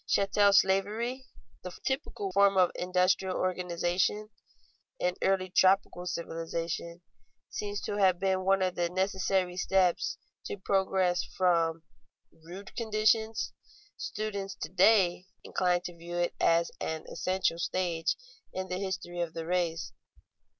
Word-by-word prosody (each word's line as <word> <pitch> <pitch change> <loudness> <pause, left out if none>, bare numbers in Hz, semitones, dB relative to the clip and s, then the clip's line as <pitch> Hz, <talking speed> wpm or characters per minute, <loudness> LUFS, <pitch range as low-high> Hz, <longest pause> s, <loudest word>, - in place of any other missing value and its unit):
Chattel 200 +1 +3
slavery, 210 +7 +2 0.3
the 180 - -7
typical 265 -7 -2
form 200 0 +4
of 180 -2 +5
industrial 185 +1 +1
organization 185 +3 0 0.7
in 180 0 0
early 190 -1 +1
tropical 185 -1 +3
civilization, 170 0 -4 0.5
seems 205 -1 -3
to 205 - -3
have 185 -3 +4
been 190 -1 +1
one 195 0 +3
of 185 -1 0
the 175 -1 -1
necessary 190 0 0
steps 185 -1 +1 0.3
to - - -4
progress 190 -2 +1
from 165 -3 +1 0.5
rude 175 +5 -11
conditions; 220 0 +1 0.4
students 200 -2 -4
to 155 - -6
day 185 -1 +4 0.2
incline 180 -1 +1
to 175 -1 -7
view 170 +1 -7
it 175 0 0
as 170 0 +3
an 160 0 -4
essential 185 -2 -1
stage 170 -2 0 0.4
in 185 0 -5
the 180 0 -2
history 185 -2 -4
of 170 -2 -3
the 165 - -4
race. 165 -5 -1
185 Hz, 125 wpm, -30 LUFS, 175-195 Hz, 0.7 s, of